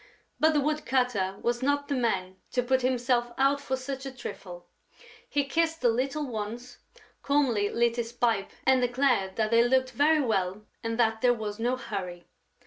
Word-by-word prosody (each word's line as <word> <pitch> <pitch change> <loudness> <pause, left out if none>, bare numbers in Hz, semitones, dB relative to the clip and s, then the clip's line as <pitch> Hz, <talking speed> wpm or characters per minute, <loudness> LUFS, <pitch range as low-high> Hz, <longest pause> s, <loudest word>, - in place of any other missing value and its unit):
But 315 +1 +4
the 295 - +3
woodcutter 250 -10 0
was 240 +1 0
not 285 +1 0
the 285 - -1
man 190 -7 -1 0.2
to 250 - +1
put 260 +1 +2
himself 245 -1 +1
out 275 +1 +2
for 265 - -2
such 265 +1 -6
a - - -5
trifle. 180 -8 -8 0.6
He 285 - +1
kissed 325 +3 0
the 245 - +4
little 270 +6 -1
ones, 235 +1 -6 0.4
calmly 255 -8 +1
lit 235 0 +1
his 235 -1 -3
pipe 230 -4 0 0.2
and 265 -1 +4
declared 245 -6 +1
that 215 0 0
they 230 0 +6
looked 260 +1 +2
very 300 +5 +3
well 205 -4 -1 0.2
and 230 0 -2
that 225 -1 +2
there 245 -1 +4
was 215 -1 -5
no 245 +3 +1
hurry. 185 -8 -6
245 Hz, 175 wpm, -28 LUFS, 220-265 Hz, 0.6 s, they